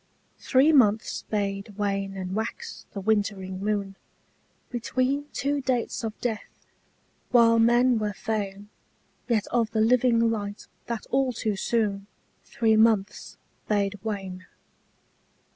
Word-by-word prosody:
THREE 270 +4 +4
months 220 -6 +3
bade 200 -1 -3
wane 195 -1 -2
and 185 0 -4
wax 455 - -5
the 200 - -6
wintering 195 -2 -1
moon 200 -2 -2 0.7
Between 255 +4 -1
two 280 +2 -1
dates 250 -3 -1
of 220 -1 -5
death, 225 -4 -5 0.6
while 230 -2 +5
men 240 +1 +4
were 210 -1 -1
fain 205 -2 -4 0.6
Yet 225 -4 +1
of 230 -2 +1
the 220 - -1
living 230 0 +3
light 205 -2 -4 0.2
that 235 -2 -4
all 265 -1 +2
too 215 -2 -2
soon 200 -1 -1 0.4
Three 225 -2 +2
months 220 -2 +2 0.3
bade 205 -1 0
wane. 195 -4 -5
220 Hz, 120 wpm, -26 LUFS, 200-240 Hz, 0.7 s, while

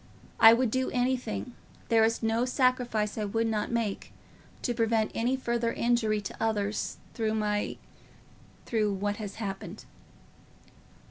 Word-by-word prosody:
I 225 - +10
would 240 -1 +1
do 260 +1 0
anything, 250 -1 -1 0.4
there 225 -2 +5
is 225 +1 +1
no 225 +1 +2
sacrifice 250 -5 +1
I 210 - -1
would 225 +3 0
not 215 -2 -1
make, 230 -4 -2 0.5
to 240 - 0
prevent 225 -1 +1
any 245 +3 +1
further 235 -2 -1
injury 230 -3 +1
to 200 - -6
others 210 -2 -1 0.2
through 220 -2 -1
my—through 210 0 -4
what 205 +1 -2
has 205 -3 -6
happened." 195 -3 -6
225 Hz, 130 wpm, -29 LUFS, 210-240 Hz, 0.5 s, I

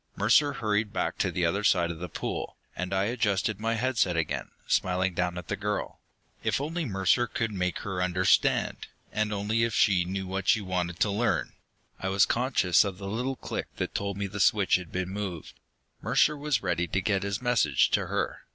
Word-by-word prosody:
Mercer 130 +8 +4
hurried 105 -4 0
back - - -2
to - - +2
the 90 - 0
other 100 +5 0
side 85 -4 +3
of 80 - -8
the 90 0 -5
pool, - - -4 0.2
and 90 +1 -4
I 95 0 +1
adjusted 105 -2 0
my 115 +1 0
head 125 +1 -1
set 90 -3 +2
again, 80 -2 -2 0.2
smiling 90 0 +1
down 90 0 -1
at 90 - -7
the 100 - -1
girl. 105 +1 -3 0.4
If - - +1
only 160 +4 -2
Mercer 95 +2 +2
could 115 0 -2
make 90 -3 -1
her 95 -4 -3
understand, 90 0 +2 0.2
and 110 0 0
if - - -1
only 110 +3 +1
she 100 -4 +3
knew 95 +1 -3
what 95 +1 +1
we 110 - -4
wanted 90 -3 -2
to 105 - +3
learn! 110 +4 0 0.5
I 95 - -2
was 95 0 +4
conscious 120 -8 +3
of 100 -3 -4
the 100 - -7
little 125 +6 -2
click - - -5
that - - -3
told 100 -1 -2
me 100 - -2
the 100 +1 -6
switch 100 -1 +4
had 90 -3 -9
been 90 0 -2
moved. 95 -5 -5 0.5
Mercer 150 - +3
was 145 -4 -1
ready 85 +1 0
to 95 - 0
get 95 0 0
his 100 +2 -2
message 120 - +2
to - - +1
her. - - -2
100 Hz, 205 wpm, -28 LUFS, 90-110 Hz, 0.5 s, Mercer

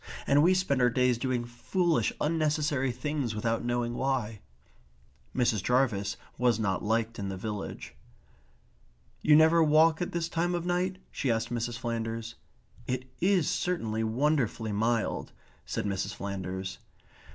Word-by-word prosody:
"And 140 +1 +4
we 180 +4 +5
spend 140 -8 +1
our 125 - +5
days 125 0 +2
doing 125 -2 -1
foolish 165 +8 0
unnecessary 150 -4 +1
things 140 -4 -2
without 115 +1 -1
knowing 120 0 -1
why." 120 -5 -1 1.0
Mrs. 115 -5 +2
Jarvis 115 -6 +1 0.2
was 120 -3 +3
not 100 -4 0
liked 115 +2 0
in 100 -1 -3
the 95 - -4
village. 105 +1 -5 1.3
"You 150 - +6
never 160 +2 +6
walk 155 +1 +4
at 175 - -2
this 170 -1 -1
time 175 +1 0
of 175 0 -3
night?" 180 +1 0
she 135 - -2
asked 115 0 0
Mrs. 120 0 -2
Flanders. 115 -1 -3 0.5
"It 130 0 -3
is 185 -3 +3
certainly 115 -12 -1
wonderfully 120 -2 0
mild," 115 +2 0 0.3
said - - -2
Mrs. 100 -1 -2
Flanders. 95 -1 -5
120 Hz, 140 wpm, -29 LUFS, 110-155 Hz, 1.3 s, You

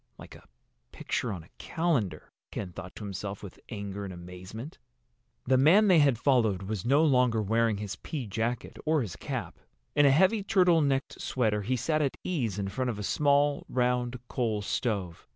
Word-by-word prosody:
"Like - - -12
a - - -16 0.4
picture 120 - -2
on 90 -5 -6
a 85 - -20
calendar," 160 - -1 0.2
Ken 95 -4 -5
thought 90 +2 -9
to - - -8
himself 100 0 -5
with 100 - -10
anger 100 -2 -5
and 100 - -5
amazement. 90 - -9 0.7
The 130 0 +3
man 190 +10 +6
they 175 -3 +6
had 140 -5 +4
followed 115 -7 +2
was 100 -1 -4
no 140 +6 +4
longer 125 -5 +3
wearing 110 +1 +1
his 105 0 -5
pea 145 -6 -5
jacket 115 +4 -3
or 155 -3 +2
his 90 -6 -6
cap. - - -5 0.4
In 145 - +6
a - - +7
heavy 190 +9 +4
turtle 180 -4 +4
necked 135 -2 -1
sweater 110 -5 0
he 125 +6 -1
sat 155 +6 0
at 140 -3 -1
ease 120 - -1
in 100 -1 -2
front 125 +5 -2
of 115 - -3
a 105 - -5
small, 145 +4 +2
round 125 0 0
coal 110 -4 -1
stove. 100 -7 -2
120 Hz, 185 wpm, -29 LUFS, 100-140 Hz, 0.7 s, a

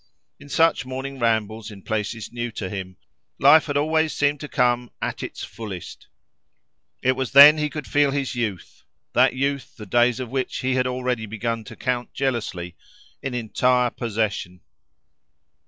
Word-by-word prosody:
In 145 0 -14
such 165 0 +3
morning 130 +1 -6
rambles 110 -1 0
in 100 -3 -12
places 110 0 -3
new 120 0 -3
to 95 -4 -5
him, 95 -2 -6 0.4
life 150 +4 +6
had 145 -1 0
always 160 +1 +1
seemed 145 0 +1
to 150 - -6
come 125 -2 +1
at - - -3
its - - -6
fullest: 100 -6 -8 1.0
it 130 - +4
was 130 0 -3
then 145 +3 +10
he 150 0 0
could 150 -1 -6
feel 145 -1 +3
his 135 -1 -2
youth, 110 -7 -4 0.3
that - - +4
youth 140 +1 -2
the 105 - -8
days 120 +4 +2
of 125 -2 -5
which 130 -1 -2
he 130 0 0
had 130 0 +1
already 125 -3 -2
begun 115 +2 -3
to - - -10
count 125 -2 -3
jealously, 105 -10 -2 0.5
in 135 -2 -4
entire 125 +1 +1
possession. 105 -5 -3
125 Hz, 160 wpm, -23 LUFS, 110-135 Hz, 1.0 s, then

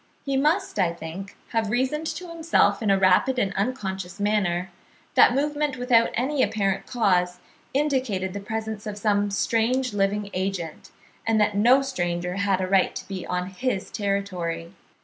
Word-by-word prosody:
He 275 -1 -1
must, 315 - +1
I 175 -3 +2
think, 170 +4 -8
have 225 -2 0
reasoned 265 +7 0
to 360 +3 -5
himself 325 -11 +2
in 215 - 0
a 195 - +5
rapid 190 +7 +3
and 200 -5 0
unconscious 195 -4 -3
manner, 190 -4 0 0.4
that 245 - +6
movement 290 -1 0
without 245 -2 +3
any 265 +3 0
apparent 200 -2 0
cause 180 -7 +1 0.3
indicated 260 -10 0
the 200 - -4
presence 220 +1 -5
of 205 -1 -5
some 205 -1 +1
strange 230 +4 +1
living 200 0 0
agent, 185 -4 -3 0.4
and 225 -1 +3
that 210 -1 +2
no 245 +6 +5
stranger 180 -7 -2
had 200 -2 +1
a 185 - -1
right 190 -1 +2
to - - -6
be 190 -2 -6
on 180 0 -2
his 200 -1 -2
territory. 180 -5 -2
205 Hz, 160 wpm, -25 LUFS, 190-250 Hz, 0.4 s, that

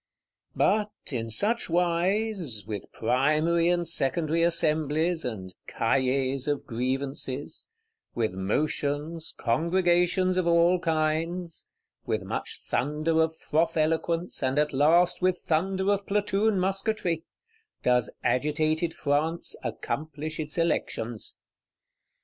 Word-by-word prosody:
But, 210 0 +2 0.2
in 115 -3 -3
such 210 - 0
wise, 175 - 0
with 105 -2 -6
primary 155 +8 +2
and 175 -1 +1
secondary 160 +2 +1
Assemblies, 160 0 +1
and 95 -7 -5
Cahiers 130 +2 0
of 145 -1 -1
Grievances; 130 +3 -3 0.5
with 115 -4 0
motions, 145 - -1
congregations 175 +6 +2
of 185 -2 +1
all 170 +1 +4
kinds; 165 +1 -1 0.4
with - - -1
much - - -4
thunder 155 +4 +1
of 160 0 0
froth 165 +2 0
eloquence, 165 +2 0
and 130 +1 0
at 150 0 +2
last 165 +7 +4
with 185 0 +2
thunder 190 +4 +1
of 200 0 -1
platoon 205 0 +1
musquetry,—does 195 - -2
agitated 155 +4 +1
France 155 +3 0
accomplish 155 +1 -4
its 155 +1 -3
Elections. 120 -9 -2
160 Hz, 105 wpm, -27 LUFS, 140-175 Hz, 0.5 s, all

